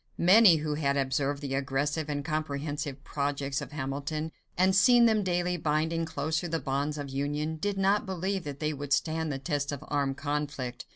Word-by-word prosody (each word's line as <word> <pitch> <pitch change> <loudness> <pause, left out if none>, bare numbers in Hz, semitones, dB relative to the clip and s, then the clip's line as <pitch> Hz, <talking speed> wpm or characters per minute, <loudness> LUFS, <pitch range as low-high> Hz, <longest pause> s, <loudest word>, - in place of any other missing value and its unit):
Many 190 +1 +7
who 155 -1 -2
had 140 -2 0
observed 140 +1 0
the 135 -1 -3
aggressive 145 +3 -1
and 145 -1 -2
comprehensive 145 -2 -3
projects 140 -1 -2
of - - -7
Hamilton, 145 +3 -3 0.3
and 185 +1 +4
seen 240 +4 +6
them 220 -2 +4
daily 180 -1 0
binding 160 +1 0
closer 160 +3 -2
the 165 0 -1
bonds 145 0 -2
of 140 -2 -5
union, 145 +3 -2
did 200 +4 -2
not 195 +2 +2
believe 190 +1 -2
that 145 -1 -6
they 155 0 -1
would 145 0 -2
stand 160 -1 0
the 135 - -2
test 145 0 -2
of 145 - -6
armed 140 -2 0
conflict. 145 -4 -3
150 Hz, 180 wpm, -29 LUFS, 140-165 Hz, 0.3 s, Many